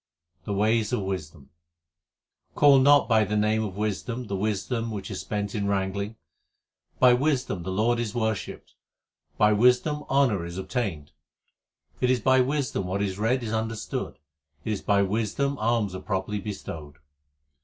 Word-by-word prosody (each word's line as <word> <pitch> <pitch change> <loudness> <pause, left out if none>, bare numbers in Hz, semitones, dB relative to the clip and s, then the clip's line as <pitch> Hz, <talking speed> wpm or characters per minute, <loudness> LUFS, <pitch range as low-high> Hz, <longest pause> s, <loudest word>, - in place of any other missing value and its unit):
The 100 - -2
ways 110 +1 +2
of 120 - +1
wisdom: 80 -6 -6 1.0
Call 140 -2 +6
not 145 +2 +5
by 110 -2 +4
the 105 +1 -1
name 110 +1 +2
of 100 -3 -5
wisdom 110 +4 -3
the 100 - -3
wisdom 110 +4 -2
which 105 -2 -6
is 95 - -4
spent 105 -1 -3
in 100 -2 -1
wrangling. 100 +2 -2 0.8
By 125 -1 +6
wisdom 125 - 0
the 95 - -5
Lord 115 +5 +1
is 115 -2 -3
worshipped; 110 -3 -3 0.6
by 105 0 +4
wisdom 125 +7 +3
honour 130 -10 +2
is 85 +1 -7
obtained. 95 - -3 0.9
It 125 - +1
is 130 -1 +3
by 130 +3 +4
wisdom 130 -8 -1
what 95 +2 -1
is 100 -1 -3
read 120 +4 +1
is 110 -1 -3
understood, 110 -8 -3 0.5
it 110 - 0
is 100 - -4
by 100 -1 +2
wisdom 115 +7 -1
alms 110 -3 +1
are 95 - -6
properly 100 +1 -2
bestowed. 80 -7 -7
105 Hz, 155 wpm, -26 LUFS, 100-120 Hz, 1.0 s, Call